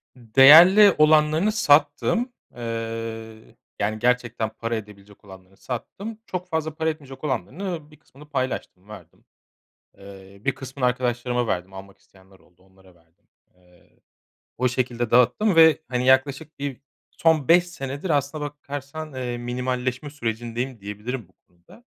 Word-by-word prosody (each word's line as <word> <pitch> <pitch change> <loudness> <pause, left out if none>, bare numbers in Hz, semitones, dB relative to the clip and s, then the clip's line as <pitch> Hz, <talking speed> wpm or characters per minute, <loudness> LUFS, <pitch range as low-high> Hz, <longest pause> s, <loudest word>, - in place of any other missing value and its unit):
Değerli 155 - +7
olanlarını 155 +5 +4
sattım. 210 - +2 0.2
Eee, 115 -1 -6 0.2
yani, 110 +1 -1
gerçekten 120 -2 0
para 115 +1 -4
edebilecek 105 -2 -11
olanlarını 95 0 -15
sattım. 200 - -7
Çok 180 -3 -5
fazla 160 -2 -2
para 160 0 0
etmeyecek 140 -3 -8
olanlarını, 155 +2 -4
bir 150 - -17
kısmını 150 0 -18
paylaştım, 130 -8 -4
verdim. 95 -6 -14 0.7
Eee, 100 0 -14
bir 135 +4 -1
kısmını 130 -1 -4
arkadaşlarıma 125 -1 -1
verdim, 90 +1 -3
almak 95 0 -11
isteyenler 95 0 -23
oldu, 90 +1 -28
onlara 95 -1 -23
verdim. 85 0 -32 0.3
Eee, 90 -1 -27 0.6
o 125 - +2
şekilde 120 -2 -2
dağıttım 125 - +3
ve, 160 -1 +6
hani, 125 -1 -1
yaklaşık 140 +3 +1
bir 140 -2 -5 0.3
son 160 -5 +1
5 175 +1 +6
senedir 140 +1 -6
aslına 145 +1 -1
bakarsan, 145 +1 -7
eee, 125 -2 -4
minimalleşme 125 +3 -3
sürecindeyim 120 -1 -4
diyebilirim 105 +3 -6
bu 95 - -30
konuda 90 - -21
125 Hz, 130 wpm, -23 LUFS, 110-150 Hz, 0.7 s, Değerli